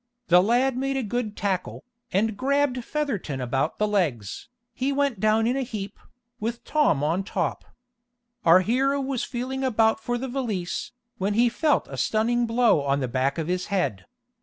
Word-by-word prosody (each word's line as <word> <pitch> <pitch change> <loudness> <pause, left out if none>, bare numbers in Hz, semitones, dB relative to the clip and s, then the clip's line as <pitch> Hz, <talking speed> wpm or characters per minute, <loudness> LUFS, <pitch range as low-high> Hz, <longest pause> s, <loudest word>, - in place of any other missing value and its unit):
The 180 +1 +7
lad 245 +5 +2
made 270 +1 -1
a 265 - -1
good 220 -1 -3
tackle, 190 -3 -2 0.3
and 215 +3 +1
grabbed 270 0 +1
Featherton 230 - -3
about 130 +2 -1
the 210 - +1
legs. 155 - -1 0.2
He 265 +2 -1
went 280 -6 0
down 215 +2 +3
in 245 +3 +1
a 270 - 0
heap, 210 -5 -6 0.4
with 230 +2 -3
Tom 295 - +2
on 165 +6 +1
top. 195 - -2 0.8
Our 170 +2 +7
hero 270 +7 +1
was 270 -2 -2
feeling 260 +2 -4
about 225 -3 +2
for 240 +2 -2
the 265 +2 -4
valise, 230 -9 -3 0.3
when 200 +2 0
he 240 +2 +4
felt 300 +5 +1
a - - -8
stunning 235 +2 +1
blow 230 -8 +3
on 140 0 0
the 130 - -1
back 130 +4 0
of 165 - -1
his 180 +1 -1
head. 175 - -1
225 Hz, 175 wpm, -25 LUFS, 185-255 Hz, 0.8 s, The